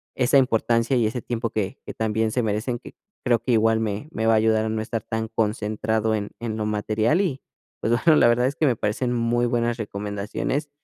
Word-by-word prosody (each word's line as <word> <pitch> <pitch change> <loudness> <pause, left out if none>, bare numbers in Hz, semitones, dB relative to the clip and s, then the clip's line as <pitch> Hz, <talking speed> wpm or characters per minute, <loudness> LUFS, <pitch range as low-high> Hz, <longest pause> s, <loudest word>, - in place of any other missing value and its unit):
esa 130 +2 +3
importancia 120 -1 +2
y 115 - +2
ese 120 +2 -3
tiempo 115 -1 -3
que 100 -3 -3
que - - -6
también 110 0 0
se 125 +2 0
merecen, 110 +3 -1
que - - -13 0.3
creo 120 -2 +3
que 120 +3 -2
igual 110 0 +3
me 110 +5 -3
me 110 - -2
va 115 - +4
a - - +5
ayudar 110 0 +2
a 110 - -1
no 110 0 -1
estar 115 -1 -4
tan 110 0 -3
concentrado 110 0 0
en 105 -1 -4
en 110 -2 -4
lo 110 - -2
material. 110 - +1
Y, 150 -9 -2 0.4
pues 115 - +1
bueno, 155 +6 +4
la - - +6
verdad 120 +2 +3
es 140 - -3
que 160 - +1
me 130 -4 +3
parecen 120 +4 -1
muy 120 0 +1
buenas 120 0 0
recomendaciones, 105 +7 -3
115 Hz, 220 wpm, -24 LUFS, 110-120 Hz, 0.4 s, la